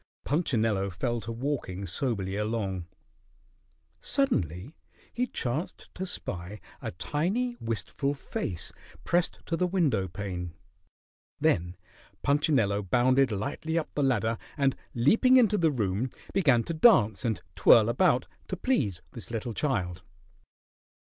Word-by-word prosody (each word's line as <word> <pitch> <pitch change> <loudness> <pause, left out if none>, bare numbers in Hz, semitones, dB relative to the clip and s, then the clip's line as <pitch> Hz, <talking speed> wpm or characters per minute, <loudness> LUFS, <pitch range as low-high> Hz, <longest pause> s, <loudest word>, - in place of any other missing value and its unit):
Punchinello 115 - +1
fell 120 +6 -2
to 115 - -6
walking 115 -7 -3
soberly 95 0 -2
along. 105 -4 -2 1.1
Suddenly 100 - 0 0.4
he 250 +1 0
chanced 135 - -3
to 190 +1 -4
spy 95 - -4 0.2
a - - -3
tiny, 190 - -1
wistful 140 +5 -2
face 90 -9 -4 0.3
pressed 175 0 0
to 165 - -1
the 180 +2 +1
window 150 - +1
pane. 90 -2 -5 0.8
Then 85 +1 +1 0.5
Punchinello 140 -9 +2
bounded 125 +6 +3
lightly 140 +10 -2
up 165 - -2
the 145 - -1
ladder, 115 -4 +1 0.2
and 135 -2 +2 0.2
leaping 225 - +5
into 225 -5 +5
the 170 -5 +3
room, 110 -1 -1 0.2
began 135 -11 +4
to 165 - -4
dance 135 - +5
and 110 -6 0 0.2
twirl 110 -2 +6
about 130 +2 +2 0.2
to 185 - -4
please 115 - 0
this 115 - -8
little 115 0 -3
child. 95 - -1
120 Hz, 125 wpm, -28 LUFS, 100-155 Hz, 1.1 s, twirl